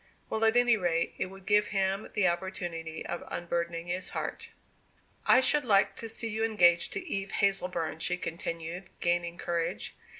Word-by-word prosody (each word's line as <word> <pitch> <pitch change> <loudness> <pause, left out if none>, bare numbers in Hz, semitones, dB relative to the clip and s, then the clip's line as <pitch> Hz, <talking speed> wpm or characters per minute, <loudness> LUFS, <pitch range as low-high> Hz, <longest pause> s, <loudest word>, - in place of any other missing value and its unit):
Well, 220 0 0
at 225 +2 +4
any 245 -2 +5
rate 170 -3 0
it - - 0
would 195 0 -13
give 210 0 +4
him 195 +1 0
the 205 -3 +4
opportunity 170 -2 -3
of - - -4
unburdening 170 -1 -3
his 180 +1 -3
heart. - - -4 0.8
"I 255 - +7
should 295 +3 +4
like 205 -4 +3
to 225 - -5
see 225 +1 -1
you 220 +1 -2
engaged 175 -6 +4
to 365 - -5
Eve 195 -8 -3
Hazleburn," 180 -5 0
she 180 +2 +1
continued, 170 +1 -5
gaining 175 0 0
courage. 165 -12 -2
180 Hz, 165 wpm, -30 LUFS, 170-210 Hz, 0.8 s, I